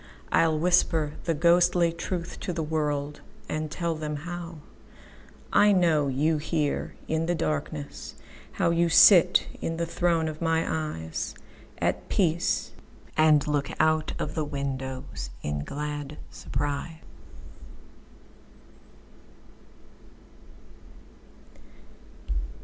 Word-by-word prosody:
I'll 160 -1 +3
whisper 165 -2 +2
the 165 - +1
ghostly 175 +1 +4
truth 170 +1 -5
to 180 - -3
the 165 -1 -2
worldAnd 150 0 -3
tell 170 +1 -2
them 155 -1 -4 1.4
howI 205 0 +5
know 160 -5 +3
you 150 +4 +1
here 150 -1 -2
in 160 +1 0
the 175 - +1
darkness, 155 -2 -4 0.4
How 170 - +1
you 170 0 +2
sit 175 +1 +7 0.2
in 165 0 -2
the 170 - -1
throne 165 -1 +1
of 155 0 -6
my 165 0 +2
eyesAt 115 - -4
peace, 170 -3 +1 0.4
and 155 -2 +4
look 145 -2 0
out 155 0 +2
of - - -3
the 155 - -1
windowsIn 130 - -5
glad 150 0 -5
surprise. 145 +4 -3
155 Hz, 95 wpm, -27 LUFS, 145-170 Hz, 1.4 s, sit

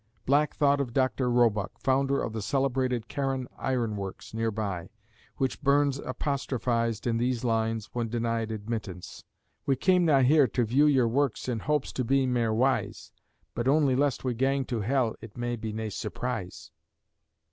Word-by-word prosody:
Black 145 +2 +2
thought 140 -1 +3
of 125 -4 -4
Dr. 130 -1 +1
Roebuck, 115 -5 +2
founder 135 +1 +1
of 110 - -4
the 110 - -3
celebrated 130 -1 0
Carron 135 -2 -2
Iron 120 -5 -1
Works 100 0 -7
near 115 0 0
by, 100 -5 -4 0.5
which 130 +1 -1
Burns 140 -1 +2
apostrophised 125 -5 -2
in 115 -2 +1
these 120 0 0
lines, 115 -2 0
when 120 -2 -2
denied 115 -1 -1
admittance: 105 -4 -6 0.4
"We 135 - +3
cam 180 +6 +3
na 145 -4 +5
here 140 +2 +5
to 120 +1 0
view 135 +7 +4
your 130 -5 +4
works 135 +1 0
In 120 -3 -1
hopes 150 +3 -1
to 130 - -1
be 135 +2 +2
mair 120 -3 +1
wise, 120 -1 0 0.4
But 120 +1 -2
only 140 -2 +4
lest 140 -1 +1
we 130 -2 0
gang 135 +3 +1
to 120 -3 -2
hell 120 0 +1
It 115 -1 -11
may 120 0 -2
be 110 -1 -5
nae 110 0 -4
surprise." 110 -2 -5
125 Hz, 170 wpm, -28 LUFS, 115-135 Hz, 0.5 s, na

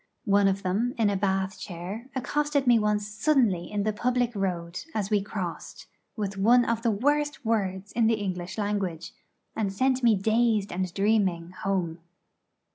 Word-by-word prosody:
One 200 -1 +4
of 195 0 0
them, 210 +7 0
in 215 -3 +3
a - - 0
Bath 190 0 -1
chair, 190 +7 -7
accosted 290 +2 0
me 240 -2 +5
once 210 -1 0
suddenly 215 - +1
in 205 -1 -1
the 215 +1 0
public 245 +1 0
road 180 -3 -3
as 210 -1 -2
we 205 -1 +3
crossed, 195 -4 -6 0.3
with 200 -3 -3
one 240 +4 +5
of 230 -1 0
the 230 - +1
worst 290 +6 0
words 200 -3 -1
in 230 -1 +2
the 225 - +3
English 185 -3 -4
language, 195 -6 -2 0.4
and 210 -3 -1
sent 260 +6 +1
me 230 -3 +5
dazed 220 0 +1
and 185 0 -2
dreaming 195 -4 +1
'home.' 185 -3 -2
205 Hz, 165 wpm, -27 LUFS, 190-230 Hz, 0.4 s, me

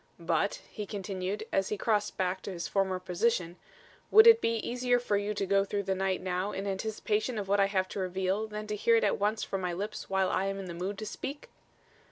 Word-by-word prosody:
"But," - - 0
he 210 -2 -6
continued, 195 0 -3
as 195 0 +1
he 210 - -2
crossed 210 0 0
back 185 0 -1
to - - -6
his 170 -4 -4
former 190 +2 +1
position, 180 -1 0 0.5
"would 440 +1 +8
it 460 0 +8
be 230 - +1
easier 245 +2 +1
for 240 -4 -1
you 205 +1 -1
to 200 - -1
go 195 +1 +3
through 200 0 -2
the 190 0 0
night 190 0 -1
now 185 +2 -1
in 195 - -4
anticipation 215 +3 -1
of 200 -2 -3
what 200 +1 +2
I 195 - +5
have 190 -1 0
to - - -5
reveal 190 +3 -1
than 210 0 -6
to 210 0 -3
hear 230 +3 +3
it 225 - +3
at 205 - +1
once 210 +2 0
from 195 - -3
my 180 -1 -1
lips 205 +5 -5
while 190 -1 +1
I 190 - +1
am 195 0 -2
in 195 - -5
the 175 - -6
mood 185 +4 -4
to 215 - -5
speak?" 280 +7 -6
200 Hz, 240 wpm, -30 LUFS, 190-215 Hz, 0.5 s, would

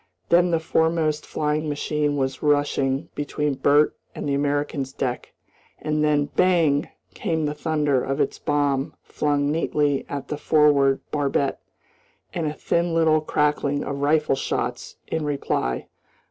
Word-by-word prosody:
Then 175 +1 +5
the 165 -1 +2
foremost 160 -1 0
flying 150 0 -1
machine 145 0 -1
was 130 -1 -2
rushing 145 -2 +1
between 150 0 -2
Bert 145 +3 +3 0.2
and - - -4
the 140 - 0
American's 145 -1 -1
deck, 125 -2 -3 0.5
and 150 0 -1
then 150 -1 +2
bang! 165 -6 +3 0.2
came 160 -2 -1
the 150 - -1
thunder 150 -4 0
of 135 +2 -2
its 140 - 0
bomb 145 -2 0
flung 145 -1 0
neatly 150 -3 0
at 140 -1 -5
the 150 - -3
forward 145 -3 +3
barbette, 140 -1 0 0.7
and 165 -3 -1
a 150 - -2
thin 170 +1 0
little 160 -1 +4
crackling 145 -1 0
of 140 0 -4
rifle 150 0 +2
shots 125 -2 -3
in 160 - -2
reply. 140 - -1
145 Hz, 140 wpm, -23 LUFS, 140-155 Hz, 0.7 s, Then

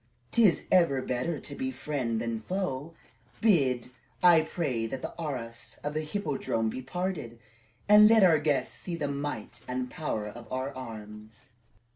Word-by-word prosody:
'T 235 - +4
is 175 - 0
ever 170 -7 +4
better 130 +5 -2
to - - -7
be 265 0 -2
friend 130 - -2
than 115 -1 -2
foe. 165 - -3 0.4
Bid, 130 - +2 0.3
I 175 -3 +8
pray, 140 -8 -2
that 130 +3 -6
the - - -4
arras 120 -7 -5
of 145 - -2
the 155 - -1
Hippodrome 150 - -1
be 130 - -5
parted, 145 -4 -4 0.5
and 210 +1 +9
let 225 -2 +6
our 165 -4 +6
guests 145 -4 0
see 175 - -5
the 150 -3 -2
might 140 -5 -4
and 125 0 -3
power 130 -10 -3
of 115 +1 -10
our 130 +2 -2
arms." 110 -3 -10
140 Hz, 160 wpm, -29 LUFS, 120-170 Hz, 0.5 s, and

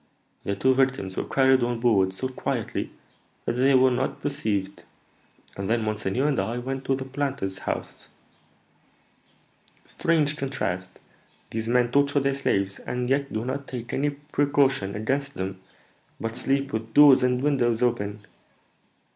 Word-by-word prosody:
The 100 - -1
two 130 +4 +3
victims 130 -8 0
were - - -2
carried 130 -1 +4
on 120 -1 0
board 100 -6 +3
so 95 +8 -3
quietly 130 - -3 0.6
that - - 0
they 130 +3 +4
were 130 0 +5
not 125 +2 -1
perceived; 105 -9 -2 0.7
and 100 +1 -4
then 115 0 +1
monseigneur 110 +5 -1
and 145 - +1
I 110 +5 -1
went 135 +2 -4
to 135 - +2
the 130 0 -5
planter's 135 -8 -3
house. - - -5 1.8
Strange 155 -3 +1
contrast! 95 -10 -3 0.5
These 110 0 -3
men 120 0 +3
torture 140 +1 +3
their 140 0 +1
slaves, 100 -8 -1
and 125 +1 -3
yet 140 0 +1
do 110 +2 -2
not 135 +2 -4
take 120 -2 -6
any 145 +2 +1
precaution 140 -6 0
against 140 +6 -2
them, 95 0 -4 0.6
but 115 0 -4
sleep 135 +1 -1
with 110 0 -4
doors 145 -3 +8
and 125 0 +2
windows 125 -5 +2
open. 105 -4 -1
125 Hz, 145 wpm, -25 LUFS, 110-140 Hz, 1.8 s, doors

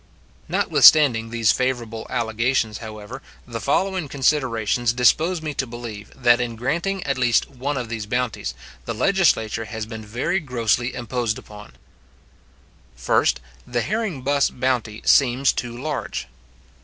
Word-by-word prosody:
Notwithstanding 120 -7 +5
these 115 -2 +2
favourable 120 -3 -2
allegations, 115 -1 0
however, 110 +3 -8 0.2
the 115 -2 -6
following 185 - 0
considerations 125 -5 +1
dispose 160 +8 +2
me 155 -2 -3
to 130 -1 -2
believe, 115 -3 -8
that 120 -2 +4
in 120 -1 -3
granting 170 +11 -2
at 140 -2 -2
least 120 -2 +2
one 135 +2 -3
of 125 -2 -3
these 110 -2 -5
bounties, 125 0 -2 0.3
the - - -4
legislature 140 - +2
has 110 0 -5
been 110 0 -8
very 120 - -1
grossly 120 - 0
imposed 120 -2 -2
upon: 105 -1 -12 1.2
First, - - +1 0.3
The 120 -1 -1
herring 205 - -2
buss 140 +1 +2
bounty 125 -4 -2
seems 130 0 +4
too 120 -1 -5
large. 145 - -4
120 Hz, 130 wpm, -22 LUFS, 115-140 Hz, 1.2 s, Notwithstanding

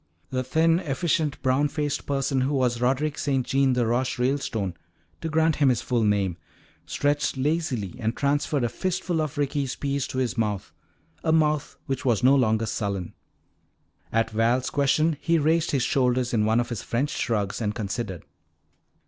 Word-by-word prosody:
The 130 0 -1
thin, 165 +5 +3
efficient, 155 -1 -1
brown 135 +2 +3
faced 145 0 -3
person 135 -1 0
who 140 +3 0
was 125 -3 +1
Roderick 135 +4 0
St. 135 -3 0
Jean 135 -1 +2
de 125 -1 +1
Roche 120 +3 0
Ralestone, 125 -7 -1 0.5
to 165 - -3
grant 160 0 +2
him 145 -3 +4
his 125 -3 +1
full 120 -2 +1
name, 100 -4 +1 0.5
stretched 145 - 0
lazily 130 - -1
and 110 +1 -2
transferred 145 -1 +1
a 120 - +1
fistful 180 +3 -1
of 155 -1 -4
Ricky's 140 -2 -1
peas 140 -1 -2
to - - -6
his 125 -2 -1
mouth, 105 -4 -2 0.5
a 160 - +2
mouth 155 -2 +1
which 135 0 -3
was 120 -3 +1
no 135 +2 +6
longer 110 -4 +2
sullen. 100 -4 -3 1.0
At 115 0 +1
Val's 120 +4 +1
question 150 +2 +2
he 170 0 +2
raised 160 +2 +2
his 135 -4 +1
shoulders 125 -2 +1
in 105 -2 +2
one 110 +2 +3
of 120 0 -1
his 120 -4 -4
French 135 +5 -1
shrugs 105 -2 -1
and 105 -1 -1
considered. 105 -4 -4
130 Hz, 170 wpm, -25 LUFS, 115-145 Hz, 1.0 s, no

